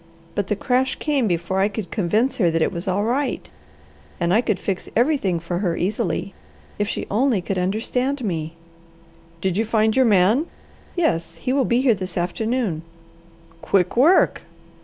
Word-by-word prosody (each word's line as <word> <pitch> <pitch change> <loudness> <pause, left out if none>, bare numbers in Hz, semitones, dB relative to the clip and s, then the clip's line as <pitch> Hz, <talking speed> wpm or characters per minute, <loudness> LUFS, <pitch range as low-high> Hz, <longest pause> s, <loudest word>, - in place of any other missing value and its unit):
"But 205 -1 -2
the 210 - 0
crash 255 +5 0
came 285 -6 0
before 175 +1 -1
I 195 - +4
could 205 -4 -6
convince 215 +6 +1
her 180 -6 +3
that 165 0 +1
it - - 0
was 170 +2 -5
all 190 +2 +1
right 260 +5 -1 0.7
and 170 0 +1
I 220 - +5
could 215 - 0
fix 195 -2 -3
everything 240 - +2
for 175 +1 -3
her 175 -4 -1
easily. 200 +1 -2 0.5
If 205 - +1
she - - -3
only 235 +1 +2
could 185 +1 -2
understand 250 +8 -1
me!" 165 -4 -3 0.9
"Did 190 0 0
you 220 - +2
find 220 -1 +1
your 260 -1 +4
man?" 215 - +3 0.5
"Yes. 165 - 0
He 250 +10 -2
will 270 -2 +2
be 240 +1 +2
here 260 -3 +4
this 185 -3 -5
afternoon." 200 0 -1 0.8
"Quick 180 +2 +1
work!" 310 +10 +4
205 Hz, 170 wpm, -22 LUFS, 180-250 Hz, 0.9 s, I